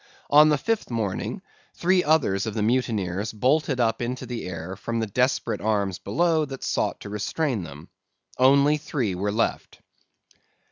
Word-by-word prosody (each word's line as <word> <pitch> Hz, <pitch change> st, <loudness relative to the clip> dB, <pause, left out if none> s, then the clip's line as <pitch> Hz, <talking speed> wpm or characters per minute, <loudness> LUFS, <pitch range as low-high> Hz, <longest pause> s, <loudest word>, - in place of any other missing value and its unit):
On 150 Hz, +1 st, +8 dB
the 150 Hz, -, +3 dB
fifth 225 Hz, +10 st, -2 dB
morning 110 Hz, -5 st, -3 dB, 0.3 s
three 180 Hz, +1 st, +2 dB
others 125 Hz, -11 st, +2 dB
of 110 Hz, -, -4 dB
the 105 Hz, -, 0 dB
mutineers 110 Hz, -4 st, 0 dB
bolted 135 Hz, +4 st, +1 dB
up 115 Hz, -1 st, +1 dB
into 125 Hz, +2 st, -3 dB
the 120 Hz, -5 st, -5 dB
air 90 Hz, +1 st, -6 dB
from 115 Hz, +4 st, -3 dB
the 110 Hz, -, 0 dB
desperate 125 Hz, +5 st, 0 dB
arms 100 Hz, -3 st, 0 dB
below 165 Hz, -2 st, +1 dB
that 135 Hz, -2 st, -8 dB
sought -, -, -1 dB
to 100 Hz, -, -8 dB
restrain 110 Hz, +4 st, -2 dB
them. 80 Hz, 0 st, -10 dB, 0.5 s
Only 140 Hz, +3 st, +5 dB
three 130 Hz, -9 st, -2 dB
were 100 Hz, +3 st, -2 dB
left. 115 Hz, +2 st, -2 dB
115 Hz, 155 wpm, -25 LUFS, 100-140 Hz, 0.5 s, On